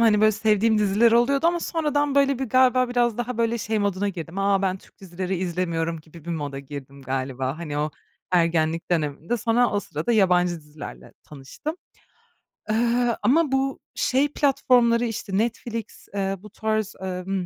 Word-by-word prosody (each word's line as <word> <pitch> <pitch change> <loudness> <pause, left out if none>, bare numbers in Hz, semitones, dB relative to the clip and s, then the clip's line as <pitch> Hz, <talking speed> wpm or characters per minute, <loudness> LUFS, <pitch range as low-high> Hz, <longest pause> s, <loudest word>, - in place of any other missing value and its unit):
Hani, 215 -2 +4
böyle 215 0 +5
sevdiğim 215 +1 +2
diziler 210 +3 +4
oluyordu 275 +6 +3
ama 345 0 +2
sonradan, 290 -4 0
böyle, 275 -2 +3
bir 265 - -1
galiba 255 +1 +3
biraz 240 -2 +1
daha, 240 0 -3
böyle, 230 0 +1
şey 220 0 -1
moduna 200 0 0
girdim, 175 0 -6
"A, 195 0 +2
ben 190 -1 +1
Türk - - -23
dizileri 185 0 -4
izlemiyorum." 170 -2 -2
gibi 160 0 -15
bir 170 - -5
moda 145 -4 -3
girdim 140 0 -9
galiba, 130 +2 -3
hani, 150 -3 -4
o 150 +1 -1 0.4
ergenlik 165 -1 +1
dönemimde. 160 +5 -1
Sonra 235 +1 +2
o 205 - 0
sırada 235 +4 -3
yabancı 180 -4 +3
dizilerle 150 - -10
tanıştım. 150 - -7 0.9
Eee, 235 +1 +2
ama 300 +2 +3
bu 270 0 0 0.2
şey 270 +3 +2
platformları, 250 -5 +3
işte, 220 -4 -3
Netflix, 230 0 -3
eee, 195 -1 -1
bu 210 +3 -12
tarz, 215 0 -2
emm, 185 0 -3
205 Hz, 160 wpm, -24 LUFS, 170-240 Hz, 0.9 s, böyle